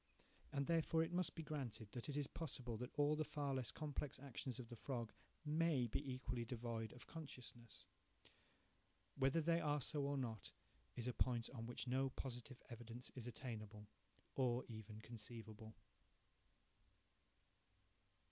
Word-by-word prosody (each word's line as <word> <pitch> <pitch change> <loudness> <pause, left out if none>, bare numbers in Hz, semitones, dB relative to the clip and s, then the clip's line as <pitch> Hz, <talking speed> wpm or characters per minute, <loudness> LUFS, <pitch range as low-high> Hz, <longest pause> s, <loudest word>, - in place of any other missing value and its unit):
And 140 -1 +2
therefore 165 0 +5
it 165 +2 -2
must 180 0 +2
be 165 - -2
granted 130 -8 -2
that 120 +3 -3
it 145 - 0
is 145 - +3
possible 130 -7 -2
that 125 +2 -2
all 145 +1 +6
the 155 - +3
far 145 -2 0
less 130 -4 +1
complex 150 -2 -1
actions 130 -2 -2
of 120 -3 -5
the 120 - -4
frog 120 -2 -2 0.3
may 150 -3 +5
be 135 +4 0
equally 125 -1 0
devoid 115 -2 -1
of 125 - -10
consciousness. 125 -7 -7 1.3
Whether 135 +4 +5
they 165 +2 +5
are 145 -1 +4
so 145 +2 +2
or 140 0 +2
not, 115 -6 -1 0.4
is 120 0 -1
a 125 - +2
point 120 -2 +3
on 115 -3 -3
which 120 - -1
no 135 +2 +4
positive 125 0 -4
evidence 120 +1 -5
is 125 -2 -4
attainable, 110 -3 -4 0.5
or 125 -2 +4
even 110 -1 -6
conceivable. 110 -1 -6
125 Hz, 145 wpm, -45 LUFS, 115-145 Hz, 1.3 s, all